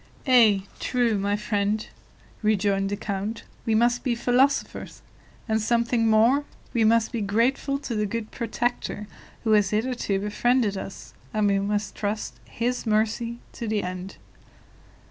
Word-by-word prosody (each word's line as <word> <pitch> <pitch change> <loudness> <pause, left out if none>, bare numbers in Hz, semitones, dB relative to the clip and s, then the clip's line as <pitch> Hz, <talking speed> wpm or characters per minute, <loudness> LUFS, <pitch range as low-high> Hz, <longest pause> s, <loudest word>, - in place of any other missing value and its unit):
"Ay, 225 -7 +5 0.2
true, 245 -3 +1
my 200 +1 +1
friend," 210 0 -1 0.5
rejoined 200 -2 +1
the 205 - -2
count; 205 +3 -4 0.2
"we 220 - +3
must 240 +2 +2
be 245 -3 +1
philosophers 250 +4 +1 0.4
and 220 -1 +1
something 235 +1 +2
more; 230 +6 +4 0.3
we 230 - +2
must 225 0 +3
be 230 - -2
grateful 235 +7 +1
to 275 -4 -5
the 210 -1 0
good 220 +1 -4
Protector 235 -2 -2 0.4
who 220 - +1
has 205 -3 +4
hitherto 215 -2 0
befriended 210 +1 +1
us, 190 -8 -8 0.2
and 215 -1 +2
we 200 -1 +3
must 205 0 -1
trust 210 +1 -3
His 245 +1 -2
mercy 225 +2 0 0.2
to 235 - -5
the 215 -1 0
end." 185 +1 -5
220 Hz, 145 wpm, -25 LUFS, 205-240 Hz, 0.5 s, Ay